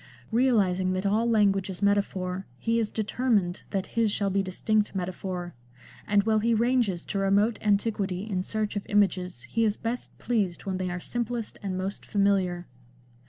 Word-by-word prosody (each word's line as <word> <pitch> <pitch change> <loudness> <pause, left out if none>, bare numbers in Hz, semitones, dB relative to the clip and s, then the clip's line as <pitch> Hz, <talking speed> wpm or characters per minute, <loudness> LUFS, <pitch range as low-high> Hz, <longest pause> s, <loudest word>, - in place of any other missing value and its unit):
Realising 200 -7 +2
that 185 +1 -2
all 220 +4 +2
language 200 -4 +3
is 190 +1 -5
metaphor 190 -2 0
he 230 - +1
is 220 -2 0
determined 215 -4 0
that 195 -2 -1
his 230 -2 +3
shall 200 -1 0
be 195 +1 +2
distinct 210 +3 0
metaphor, 180 -1 -4 0.5
and 205 -1 +4
while 220 0 +3
he 230 +2 +2
ranges 230 -6 +1
to 200 - -2
remote 200 +3 +2
antiquity 205 -2 0
in 190 -4 -1
search 215 +2 -2
of 205 - -4
images 185 -9 +1
he 230 - -1
is 215 -2 +1
best 230 +2 -4
pleased 205 -8 -1
when 190 -1 -2
they 185 -1 -1
are 180 0 -3
simplest 235 +2 -3
and 190 -2 -3
most 190 +2 -4
familiar. 190 -3 +1
200 Hz, 165 wpm, -27 LUFS, 185-220 Hz, 0.5 s, and